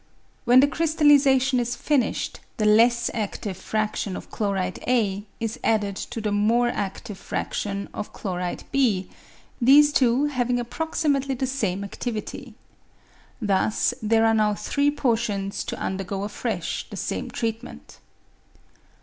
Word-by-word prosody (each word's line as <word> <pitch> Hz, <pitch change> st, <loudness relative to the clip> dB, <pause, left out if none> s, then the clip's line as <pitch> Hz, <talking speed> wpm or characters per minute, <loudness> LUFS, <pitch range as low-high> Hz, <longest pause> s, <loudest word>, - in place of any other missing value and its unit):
When 250 Hz, +2 st, +7 dB
the 285 Hz, -, +5 dB
crystallisation 285 Hz, -4 st, +3 dB
is 240 Hz, 0 st, -1 dB
finished, 285 Hz, -5 st, -1 dB, 0.2 s
the 215 Hz, -, 0 dB
less 235 Hz, +3 st, +4 dB
adtive 205 Hz, -3 st, -3 dB
fradtion 210 Hz, -1 st, -2 dB
of -, -, -11 dB
chloride 195 Hz, -3 st, -2 dB
A 205 Hz, -5 st, +1 dB
is 225 Hz, -1 st, -3 dB
added 205 Hz, -3 st, +1 dB
to 240 Hz, +4 st, -5 dB
the 210 Hz, -1 st, -2 dB
more 230 Hz, +4 st, +2 dB
adtive 200 Hz, 0 st, -5 dB
fraction 200 Hz, 0 st, -3 dB
of -, -, -5 dB
chloride 180 Hz, -2 st, -4 dB
B, 225 Hz, -9 st, +2 dB, 0.5 s
these 290 Hz, +4 st, +6 dB
two 255 Hz, +1 st, +3 dB
having 250 Hz, -4 st, 0 dB
approxi 315 Hz, +7 st, -3 dB
mately 270 Hz, -1 st, -2 dB
the 265 Hz, -, 0 dB
same 210 Hz, -8 st, -2 dB
adtivity. 225 Hz, +3 st, -6 dB, 0.8 s
Thus 205 Hz, -1 st, +1 dB
there 225 Hz, +1 st, +3 dB
are 225 Hz, -, +4 dB
now 210 Hz, -1 st, +2 dB
three 280 Hz, +7 st, +1 dB
portions 225 Hz, -8 st, -1 dB
to -, -, -4 dB
undergo 195 Hz, +1 st, -3 dB
afresh 205 Hz, -, -3 dB
the -, -, -8 dB
same -, -, -3 dB
treatment. 230 Hz, +1 st, -5 dB
225 Hz, 130 wpm, -24 LUFS, 205-260 Hz, 0.8 s, When